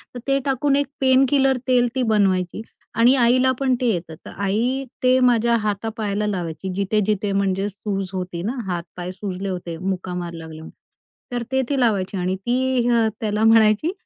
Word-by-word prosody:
तर - - -5
ते 275 0 +2
टाकून 275 +1 +1
एक 285 0 +1
पेन 260 0 +5
किलर 270 -2 +3
तेल 250 -1 +4
ती 260 - +1
बनवायची. 190 -2 +1 0.3
आणि 235 +4 +5
आईला 255 +1 +4
पण 265 -2 +2
ते 250 - +1
येतं 170 -2 -5
तर - - -8
आई 240 +7 0 0.2
ते 255 0 +4
माझ्या 235 -2 +3
हातापायाला 210 0 -2
लावायची. 180 -2 -4
जिथे-जिथे 205 +1 0
म्हणजे 195 0 0
सूज 195 -1 -4
होती 180 -2 -4
ना, 235 +7 -3
हात 175 -2 -2
पाय 180 0 -4
सुजले 195 0 -5
होते 175 -3 -5
मुका 185 0 -3
मार 175 -1 -5
लागले, 160 -1 -9 0.7
तर 240 -1 -1
ते 265 0 +2
ती 280 -2 0
लावायची. 200 -5 +1
आणि 185 +1 -1
ती 245 +4 0 0.3
त्याला 210 0 0
म्हणायची, 225 +6 +4
210 Hz, 170 wpm, -22 LUFS, 185-250 Hz, 0.7 s, पेन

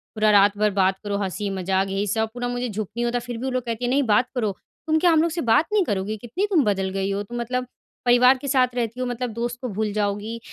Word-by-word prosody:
पूरा 215 0 +3
रात 200 0 +5
भर 210 0 +3
बात 190 +1 +2
करो 200 -1 -2
हँसी-मज़ाक 195 -1 -1
यही 195 +2 -1
सब 220 +2 0
पूरा 245 0 -3
मुझे 245 0 -2
झुक 210 -2 -4
नहीं 240 - 0
होता 245 +1 0
फ़िर 240 -1 -6
भी 245 - -7
वो 265 - -1
लोग 255 -1 -1
कहती 230 +1 -3
हैं 245 - 0
नहीं 280 +2 +2
बात 230 +2 +2
करो। 220 -5 0 0.4
तुम 315 - +3
क्या 350 0 +4
हम 315 -1 +4
लोग 335 0 +1
से 335 - -2
बात 235 +5 +3
नहीं 410 -3 +4
करोगी? 205 0 -2
कितनी 245 - -2
तुम 335 -7 +3
बदल 190 -2 0
गई 195 +1 -2
हो? 200 +1 -1
तुम 240 +3 -6
मतलब, 250 +1 -2 0.4
परिवार 250 +2 +6
के 280 - -7
साथ 255 -2 +2
रहती 235 0 -2
हो 255 - -1
मतलब 245 0 -3
दोस्त 240 +1 -3
को 250 - -3
भूल 215 +1 -2
जाओगी? 210 +2 -2
230 Hz, 270 wpm, -23 LUFS, 205-250 Hz, 0.4 s, परिवार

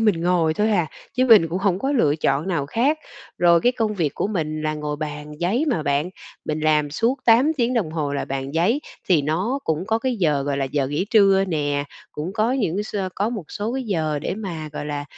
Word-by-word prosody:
mình 210 -7 +2
ngồi 170 -2 +2
thôi 210 +5 +1
à, 180 -6 +2 0.3
chứ 255 +1 +2
mình 215 -9 +7
cũng 175 +3 -2
hổng 195 -2 +1
có 270 +5 -1
lựa 155 - +2
chọn 150 +2 0
nào 165 -7 -1
khác. 265 - +1 0.4
Rồi 170 -1 +5
cái 245 - +3
công 225 -4 -1
việc 160 -8 -1
của - - -1
mình 155 -7 -3
là 155 0 -1
ngồi 150 -1 -4
bàn 150 0 -6
giấy 205 - +1
mà 165 -11 0
bạn, 145 +4 0 0.3
mình 155 0 -2
làm 150 -1 +2
suốt 230 - 0
8 245 +7 +5
tiếng 245 0 +1
đồng 205 -10 0
hồ 150 -3 -2
là 140 - -2
bàn 135 +1 -4
giấy, 200 - +2 0.3
thì 165 -5 +4
nó 180 - -1
cũng 160 +3 -1
có 225 +1 +1
cái 250 +1 -1
giờ 150 -8 +1
gọi 140 0 -1
là 140 - 0
giờ 135 0 -1
nghỉ 145 +6 -1
trưa 195 -3 +5
nè. 145 -3 -1 0.3
Cũng 155 +5 -5
có 220 +3 +1
những 210 -10 0
cái 205 - -1
sơ 200 -3 -3
có 205 +2 0
một 215 -8 -5
số 210 +3 -3
cái 265 - -2
giờ 160 -8 -1
để 150 - -3
mà, 170 -7 -5
gọi 150 - -5
là, 145 -1 -3
170 Hz, 240 wpm, -22 LUFS, 150-215 Hz, 0.4 s, mình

